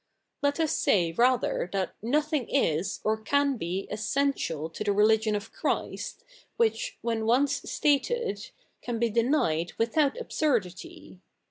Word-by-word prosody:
Let 285 +1 +1
us 320 -2 +1
say 170 -4 +2
rather 240 -2 +1
that 190 -2 -1
fiothing 295 +3 0
is 165 - 0
or 220 0 +1
can 285 +4 +2
be 185 0 -3
essential 215 - -1
to 165 +6 -6
the 210 - -1
religioft 215 +1 +3
of 205 0 -5
Christ - - -3 0.3
which, - - 0
wheri 230 -1 -1
once 265 +5 +2
stated, 290 - 0 0.3
can 240 -1 -3
be 230 0 +1
denied 215 - +1
without 280 - +1
absurdity. 300 - -2
235 Hz, 130 wpm, -28 LUFS, 205-285 Hz, 0.3 s, religioft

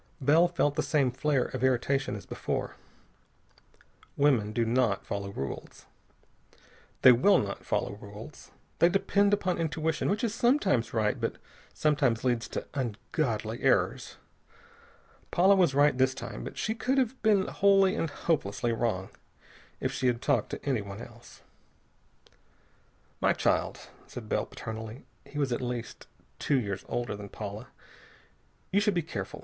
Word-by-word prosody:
Bell 155 +5 +5
felt 160 -4 +1
the - - 0
same 140 -5 +1
flare 135 0 +1
of - - -5
irritation 130 -1 +1
as 105 - -8
before. - - -3 1.4
Women 130 -8 +3
do 115 +1 0
not 115 -3 +1
follow 100 0 -4
rules. 70 -8 -6 1.2
They 130 - +10
will 135 +12 +5
not 100 -1 -3
follow - - -1
rules. 105 +7 -11 0.3
They 170 - +6
depend 200 +2 +2
upon 185 -4 +1
intuition, 160 -1 -1
which 210 +5 0
is 225 -3 0
sometimes 235 - +2
right, 110 -2 0
but - - -1 0.4
sometimes 140 -6 +1
leads 120 -2 0
to - - -5
ungodly 115 -2 -2
errors. - - +1 1.1
Paula 190 +3 +5
was 175 -8 +3
right 145 0 +5
this 130 0 +2
time, - - -7
but - - -8
she 220 - -1
could 255 +3 -1
have 260 -1 0
been 205 -4 +3
wholly 195 -1 +4
and 165 - -1
hopelessly 120 -7 -1
wrong. 110 -5 -1 0.7
If - - -1
she 130 - -1
had 120 -1 +1
talked 130 -3 +1
to - - -7
anyone 105 -7 -2
else.... 120 0 -13 1.8
"My - - +3
child," - - 0 0.3
said - - -8
Bell - - -1
paternally 110 +2 -7 0.2
he 145 - -10
was 140 -3 0
at 120 - -1
least 120 -2 -5 0.3
two 140 -3 +2
years 100 -4 -4
older 120 -3 -2
than 100 0 -9
Paula 105 0 -7 1.0
"you 200 - +4
should 205 -1 +1
be 170 - +1
careful. 100 -11 -6
130 Hz, 145 wpm, -29 LUFS, 115-170 Hz, 1.8 s, They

